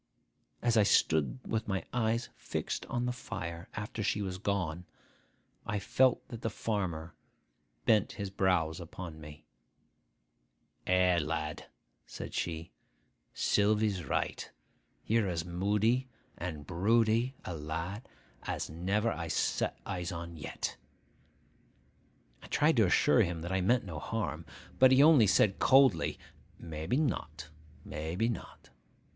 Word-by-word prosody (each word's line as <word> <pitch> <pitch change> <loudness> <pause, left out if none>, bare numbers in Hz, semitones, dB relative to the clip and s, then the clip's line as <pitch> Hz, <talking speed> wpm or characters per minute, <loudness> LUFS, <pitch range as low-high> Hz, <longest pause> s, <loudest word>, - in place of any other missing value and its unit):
As 120 -1 +3
I - - +7
stood 80 - +3
with 110 -1 -1
my 95 -4 -2
eyes 115 0 0
fixed - - -4
on 120 0 -1
the 125 - 0
fire, 85 -8 -6
after 105 +2 -4
she 105 0 0
was 95 -1 -4
gone, 90 -4 -2 0.8
I 105 - -2
felt 125 +6 +2
that 115 -1 -7
the 115 - -1
farmer 90 -7 -3 0.7
bent 105 -3 +3
his 100 -2 -5
brows 90 -4 +1
upon 85 -2 -8
me. 75 0 -11 1.4
'Eh, 90 -1 +4
lad!' 75 0 -3 0.4
said - - -7
he; 80 0 -3 0.6
'Sylvy's 105 -2 +2
right. 65 - -2 0.6
You're 110 -3 +2
as 85 -2 -2
moody 105 +8 +1 0.3
and 80 -5 -5
broody 115 - +2
a 90 - -4
lad 85 +8 -5 0.3
as - - -4
never 100 +7 0
I 85 -4 -4
set - - 0
eyes 90 0 -3
on 85 -1 -6
yet.' 75 - -4 1.6
I - - -12
tried - - +3
to - - +5
assure - - +4
him 85 -1 -1
that 85 +2 -5
I 95 0 +1
meant 120 +6 +2
no 80 -5 -5
harm; - - -3 0.3
but 130 0 +7
he 130 +2 +7
only 150 -9 +7
said 95 +1 +3
coldly, 135 -2 +4 0.4
'Maybe 80 - -3
not, 80 - -2 0.4
maybe 85 +9 -2
not! 115 - -7
95 Hz, 130 wpm, -31 LUFS, 85-110 Hz, 1.6 s, I